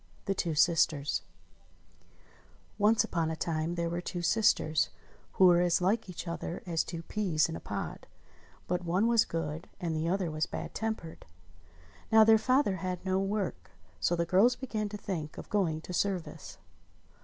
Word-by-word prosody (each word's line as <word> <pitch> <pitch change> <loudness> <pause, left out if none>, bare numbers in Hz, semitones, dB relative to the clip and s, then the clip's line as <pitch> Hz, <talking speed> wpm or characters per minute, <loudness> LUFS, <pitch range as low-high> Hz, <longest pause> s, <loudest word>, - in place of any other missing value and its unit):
THE 195 - +1
TWO 170 -4 -2
SISTERS 150 -3 +2 1.6
ONCE 215 +2 +4
upon 165 -3 -1
a 160 - -2
time 160 +1 -2
there 170 -1 -1
were 170 +1 -2
two 175 0 -5
sisters 175 -5 +2 0.4
who 190 - +5
were 175 -1 +6
as 175 -1 +3
Hke 195 +3 0
each 180 0 -7
other 170 +1 -5
as 165 -3 0
two 165 -1 -6
peas 175 -6 +1
in 165 - -5
a - - -5
pod; - - -6 0.6
but 180 0 -1
one 180 +5 +1
was 230 -1 +4
good, 165 +1 -4
and 170 -4 -2
the 160 +2 -1
other 185 -3 0
was 155 +1 -1
bad - - -6
tempered. 220 -7 -5 0.8
Now 220 0 +8
their 220 0 +6
father 255 -4 +2
had 185 +1 -4
no 190 0 +1
work, 195 - -2 0.3
so 170 - +1
the 170 0 0
girls 195 +8 +4
began 220 -5 -3
to 210 - -6
think 165 -7 -5
of - - -9
going 170 -7 +1
to 180 - -8
service. 185 -2 -3
175 Hz, 170 wpm, -30 LUFS, 165-205 Hz, 1.6 s, Now